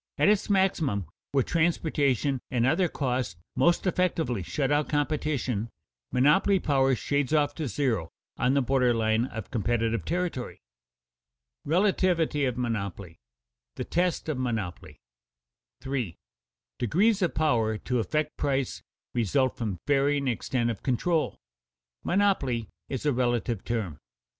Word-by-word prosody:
At - - +4
its 210 0 +2
maximum 165 - +1 0.3
where 135 -2 +3
transportation 145 -6 +1
and 120 -3 +1
other 180 +7 +3
costs 125 - -2 0.2
most 170 +2 +3
effectually 165 - 0
shut 135 - -1
out 145 0 +1
competition, 145 -7 -1 0.4
monopoly 150 +10 +4
power 135 -4 +2
shades 140 +5 0
off 145 -1 +2
to 155 -1 -3
zero 115 - -1 0.3
on 130 +2 +1
the 140 - +3
border 125 -2 +2
line 110 +1 +2
of 110 -5 -7
competitive 115 -2 0
territory. 175 -8 -3 1.1
[Sidenote: 160 +4 +2
Relativity 170 -7 +2
of 125 -2 -1
monopoly] 100 -6 -3
[Sidenote: - - -62
The - - -3
test 175 0 0
of 150 -5 -2
monopoly] 115 -9 -3 0.8
3. 125 -11 -3 0.6
_Degrees 195 - +2
of 180 - +1
power 115 -8 +2
to 125 +3 -1
affect 150 +9 -1
price 135 -2 -1 0.3
result 125 +3 +1
from 105 -6 -3
varying 140 0 +2
extent 120 0 0
of 110 - -7
control; 155 +6 0 0.7
monopoly 145 - +1 0.2
is 135 +2 -4
a 145 - +3
relative 120 -3 0
term. 105 -10 -3
130 Hz, 130 wpm, -27 LUFS, 115-155 Hz, 1.1 s, At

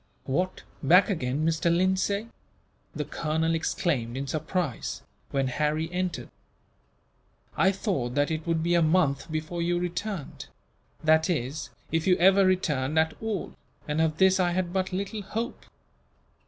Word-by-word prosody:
"What! 180 +7 -1 0.2
Back 180 +8 +5
again, 145 -3 -1
Mr. 165 +1 +2
Lindsay?" 190 +4 +1 0.7
the - - -2
colonel 160 +1 -1
exclaimed, 135 -7 -1
in 135 - -2
surprise, 155 -1 -3 0.3
when 135 -1 0
Harry 150 +4 -1
entered. 180 0 -3 1.3
"I 190 - +4
thought 180 - -2
that 145 +2 +2
it 160 +1 -3
would 165 -1 +1
be 170 +1 +1
a 170 - +4
month 155 -3 +2
before 155 +2 -3
you 175 +1 +1
returned 180 -1 -4 0.6
that 160 +1 +4
is, 150 -2 -2 0.2
if 165 +1 0
you 180 - +5
ever 195 +2 +6
returned 155 -6 0
at 160 0 +3
all, 220 -4 -3 0.3
and 150 +1 0
of 160 -1 +1
this 190 0 +4
I 175 -1 +2
had 180 -1 -1
but 185 -1 0
little 200 +3 -3
hope. 225 +5 -5
170 Hz, 145 wpm, -27 LUFS, 155-185 Hz, 1.3 s, ever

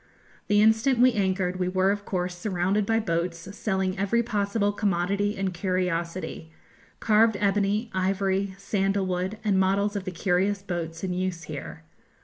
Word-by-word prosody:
The 205 0 +4
instant 220 +4 +3
we 250 +1 +5
anchored 190 -3 0
we 180 - 0
were 185 +1 +2
of 205 0 -3
course 180 -1 -2
surrounded 190 +2 0
by 225 0 +2
boats 170 -4 -1 0.2
selling 190 -3 -1
every 230 +4 +2
possible 205 -1 0
commodity 200 0 0
and 195 -1 -1
curiosity, 175 -2 -2 0.5
carved 220 0 +4
ebony, 205 +3 +1
ivory, 190 +1 0
sandal 195 0 0
wood, 185 +3 -2
and 200 -3 +2
models 200 +2 +1
of 200 -2 -3
the 185 - -3
curious 195 +2 0
boats 170 -3 -4
in 185 -1 -1
use 180 -2 -2
here. 155 +1 -7
195 Hz, 150 wpm, -26 LUFS, 180-205 Hz, 0.5 s, we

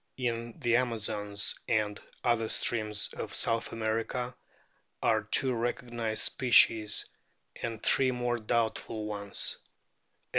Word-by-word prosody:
In 120 -2 -2
the 120 -4 +3
Amazons 105 -4 -1
and 105 -3 0 0.2
other 115 -2 +2
streams 105 -3 0
of - - -4
South 115 0 0
America 115 +3 -2 0.7
are - - +3
two 130 -1 +1
recognised 120 -1 -1
o - - +3
species, 115 -4 +4 0.6
and 115 -2 -4
three 135 -1 +4
more 120 -1 -1
doubtful 110 -1 -1
ones. 100 -1 -1
115 Hz, 110 wpm, -30 LUFS, 110-120 Hz, 0.7 s, species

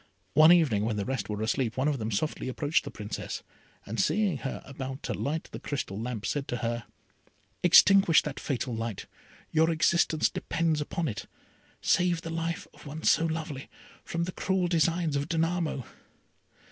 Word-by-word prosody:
One 155 +2 +8
evening, 145 -13 +4
when 110 0 0
the 100 - -1
rest 130 -3 -3
were 105 0 -2
asleep, 115 +1 0
one 130 +3 +1
of 145 -3 0
them 110 0 -2
softly 130 +6 -2
approached 145 +4 0
the - - -4
Princess, 105 0 -6 0.4
and 110 +2 -4
seeing 195 - +2
her 135 - -5
about 135 0 -6
to - - -2
light 155 +3 -2
the - - -6
crystal 115 -8 -4
lamp, 115 -3 -4
said 145 -2 -2
to 120 - -2
her, 120 0 -2 0.8
"Extinguish 185 -1 +7
that 150 -2 -5
fatal 130 -3 -2
light, 115 -3 -4 0.5
your 160 +1 +4
existence 160 -1 +3
depends 160 -2 -1
upon 165 +2 -2
it. 110 - -5 0.5
Save 175 -2 +2
the 165 - -5
life 165 0 -2
of - - -14
one 155 +3 -7
so 165 - +4
lovely 155 -4 -4 0.3
from 170 0 -2
the 180 - -3
cruel 190 0 0
designs 165 -2 +1
of 140 +2 -1
Danamo." 165 -5 0
150 Hz, 170 wpm, -28 LUFS, 125-165 Hz, 0.8 s, One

